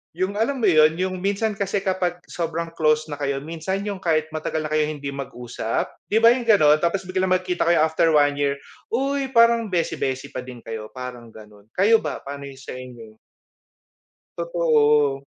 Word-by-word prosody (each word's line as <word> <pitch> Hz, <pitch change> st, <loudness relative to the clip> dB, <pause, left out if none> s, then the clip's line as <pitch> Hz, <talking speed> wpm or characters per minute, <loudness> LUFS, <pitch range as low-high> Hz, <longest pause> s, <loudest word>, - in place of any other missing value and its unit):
Yung 190 Hz, +4 st, -2 dB
alam 235 Hz, +6 st, +1 dB
mo 200 Hz, -, +5 dB
yun, 155 Hz, 0 st, +5 dB
yung 185 Hz, +1 st, -2 dB
minsan 200 Hz, +3 st, 0 dB
kasi 200 Hz, -1 st, -2 dB
kapag 180 Hz, -2 st, -1 dB
sobrang 165 Hz, 0 st, -3 dB
close 155 Hz, 0 st, +2 dB
na 145 Hz, -, -5 dB
kayo, 140 Hz, -1 st, -2 dB
minsan 165 Hz, +5 st, -4 dB
yung 200 Hz, -2 st, -4 dB
kahit 155 Hz, -2 st, 0 dB
matagal 155 Hz, 0 st, -3 dB
na 155 Hz, -, -5 dB
kayong 155 Hz, 0 st, 0 dB
hindi 140 Hz, -, -3 dB
mag-usap, 125 Hz, -4 st, -4 dB, 0.2 s
di 215 Hz, -, +1 dB
ba, 230 Hz, -, +9 dB
yung 240 Hz, -1 st, -1 dB
gano'n? 155 Hz, -9 st, +5 dB
Tapos 175 Hz, +4 st, 0 dB
biglang 185 Hz, 0 st, -1 dB
magkikita 180 Hz, -2 st, -1 dB
kayo 170 Hz, -2 st, +4 dB
after 160 Hz, +1 st, +2 dB
1 145 Hz, -1 st, +3 dB
year, 140 Hz, -1 st, +1 dB, 0.3 s
uy, 275 Hz, +3 st, -1 dB
parang 230 Hz, -1 st, +5 dB
beshy-beshy 150 Hz, -8 st, -2 dB
pa -, -, -5 dB
din 125 Hz, -2 st, -10 dB
kayo, 110 Hz, -1 st, -6 dB
parang 125 Hz, -2 st, -7 dB
gano'n. 105 Hz, -2 st, -15 dB
Kayo 215 Hz, +4 st, +5 dB
ba, 150 Hz, -, -5 dB
paano 140 Hz, 0 st, -7 dB
yung 135 Hz, -, -10 dB
sa 130 Hz, -, -9 dB
inyo? 120 Hz, -4 st, -11 dB, 1.2 s
Totoo. 150 Hz, -5 st, +2 dB
160 Hz, 180 wpm, -23 LUFS, 140-190 Hz, 1.2 s, ba